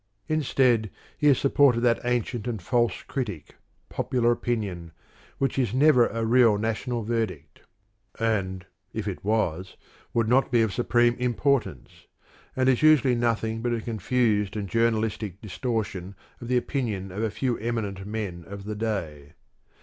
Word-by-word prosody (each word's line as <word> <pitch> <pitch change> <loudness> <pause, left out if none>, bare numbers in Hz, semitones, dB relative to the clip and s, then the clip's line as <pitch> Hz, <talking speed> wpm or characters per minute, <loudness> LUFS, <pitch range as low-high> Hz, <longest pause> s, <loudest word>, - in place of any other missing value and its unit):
Instead, 130 -7 +2 0.3
he 150 - +1
has 140 -3 +6
supported 135 -3 +3
that 120 -1 +3
ancient 120 -1 -1
and 115 -3 -2
false 120 +5 0
critic, 105 - -5 0.3
popular 125 -2 0
opinion, 100 -9 -3 0.4
which 135 -1 0
is 120 -3 0
never 130 -3 +5
a 115 0 -3
real 115 -2 +5
national 115 +2 -2
verdict 105 -10 -3 0.6
and, 95 -5 -1 0.3
if 110 -1 -4
it 95 - -5
was, 95 -4 -1 0.3
would 115 -1 +1
not 130 +4 +3
be 120 -2 +4
of 110 -3 -1
supreme 120 0 +3
importance 125 - -1 0.5
and 130 0 +1
is 130 -2 +3
usually 155 -4 +5
nothing 115 -2 0
but 120 0 0
a - - -3
confused 110 -2 0
and 100 -2 -4
journalistic 110 -3 0
distortion 100 -3 -4 0.3
of 120 - -7
the 125 0 +2
opinion 110 -8 -2
of 100 +4 -4
a 110 - 0
few 125 +2 -2
eminent 105 -4 -3
men 100 -6 -4
of 100 0 -8
the 105 +1 -5
day. 80 -10 -4
115 Hz, 150 wpm, -26 LUFS, 100-125 Hz, 0.6 s, has